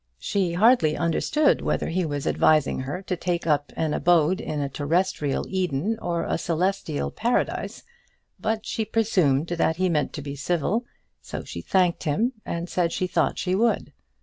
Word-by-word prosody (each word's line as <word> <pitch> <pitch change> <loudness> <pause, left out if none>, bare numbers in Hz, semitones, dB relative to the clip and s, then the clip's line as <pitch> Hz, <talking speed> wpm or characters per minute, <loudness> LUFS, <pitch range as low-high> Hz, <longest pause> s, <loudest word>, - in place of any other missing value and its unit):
She 185 - -1
hardly 185 -5 +4
understood 285 - +2
whether - - -1
he 175 0 0
was 145 -2 -3
advising 155 -3 +3
her 145 +9 -4
to 185 - -2
take 175 -1 -2
up 145 -2 +1
an 155 -2 0
abode 175 +1 +3
in 150 - -3
a 140 - -1
terrestrial 145 0 0
Eden 185 +3 -1
or 170 -1 -1
a - - -1
celestial 175 -2 -1
Paradise; 240 +2 -1 0.6
but 220 0 -2
she 225 - -2
presumed 180 -10 +1
that 165 -1 +1
he 185 +2 +1
meant 150 -5 0
to 150 - -6
be 140 -1 -5
civil, 175 - -1 0.4
so - - -6
she - - -7
thanked 180 -3 +1
him 215 - +1
and 170 +1 -3
said 175 -1 0
she 185 - -1
thought 180 - 0
she 185 - -1
would. 225 +4 +1
175 Hz, 170 wpm, -25 LUFS, 150-195 Hz, 0.6 s, hardly